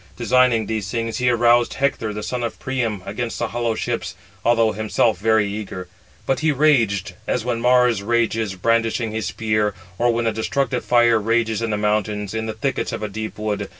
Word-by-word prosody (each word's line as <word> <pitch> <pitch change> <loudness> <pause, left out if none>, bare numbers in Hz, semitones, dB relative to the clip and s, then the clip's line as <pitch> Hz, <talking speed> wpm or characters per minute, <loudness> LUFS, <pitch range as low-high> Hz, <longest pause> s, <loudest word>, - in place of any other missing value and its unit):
Designing 120 -1 +3
these 105 -2 -3
things, 115 0 -2
he 125 0 +2
aroused 120 0 +3
Hector, 135 -5 0
the 105 0 -5
son 125 +2 -3
of 115 - -3
Priam, 115 -7 -2
against 115 +4 -4
the 115 - -2
hollow 115 -1 -1
ships, - - -3 0.3
although 115 -2 +3
himself 110 0 0
very 110 0 +3
eager. 100 -3 -6 0.4
But 135 - 0
he 155 0 +2
raged, 125 -10 +2
as - - -1
when 120 -2 -1
Mars 125 -3 +4
[rages], 115 -2 0
brandishing 115 +3 0
his 110 -4 -3
spear, 105 +2 0 0.2
or 120 0 +3
[when] 115 0 -1
a 115 - +2
destructive 125 +3 -1
fire 120 -2 +4
rages 115 0 0
in 115 - -1
the 105 - 0
mountains, 105 -1 -1
in 110 0 -3
the 110 - -3
thickets 130 +5 -2
of - - -5
a - - -1
deep 110 +2 -6
wood. 105 -1 -3
115 Hz, 190 wpm, -21 LUFS, 105-120 Hz, 0.4 s, Mars